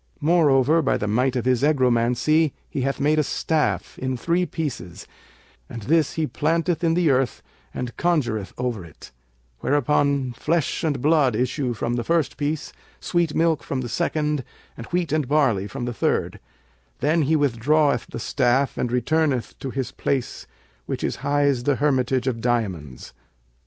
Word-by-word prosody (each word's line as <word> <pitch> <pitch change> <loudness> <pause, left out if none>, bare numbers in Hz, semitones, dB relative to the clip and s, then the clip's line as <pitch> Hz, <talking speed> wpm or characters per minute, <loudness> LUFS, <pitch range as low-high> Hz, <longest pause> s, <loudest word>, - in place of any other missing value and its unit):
Moreover, 155 -2 +4
by 140 - +1
the - - -3
might 125 +5 +1
of 125 -2 -1
his 125 -2 +2
egromancy 135 +2 +2
he 135 - -4
hath 135 +1 -1
made 150 +2 +2
a - - +3
staff, 155 +2 -1
in 130 -1 -2
three 175 +7 0
pieces, 125 - -5 0.6
and 115 -2 -7
this 155 +4 +2
he 160 - 0
planteth 165 +4 0
in 165 -1 +2
the 170 -4 +3
earth 130 -1 0 0.3
and 125 -1 -5
conjureth 120 - 0
over 125 -6 -2
it; 80 -3 -14 0.5
whereupon 140 -2 +1
flesh 160 +6 -1
and 145 -6 -1
blood 150 -6 +3
issue 125 +1 -1
from 120 +2 -2
the 120 - -1
first 165 +2 0
piece, 150 +1 -3 0.3
sweet 170 -3 0
milk 160 -5 +2
from 130 +3 -3
the 125 - -4
second 150 +1 -1 0.3
and 115 - -9
wheat 175 -3 -1
and 155 -3 0
barley 125 -9 +2
from 125 +2 -5
the 120 - -3
third; - - -1 0.6
then 155 +4 +2
he 155 +2 +2
withdraweth 145 +2 +2
the - - -7
staff 130 +1 +1
and 120 - -1
returneth 130 +1 0
to 135 - -5
his 130 0 -3
place 135 -3 -3 0.4
which - - -3
is - - -1
highs 140 -3 +1
the 145 +3 +1
Hermitage 130 -3 +1
of 120 -4 -2
Diamonds. 95 - -2
140 Hz, 160 wpm, -23 LUFS, 120-155 Hz, 0.6 s, Moreover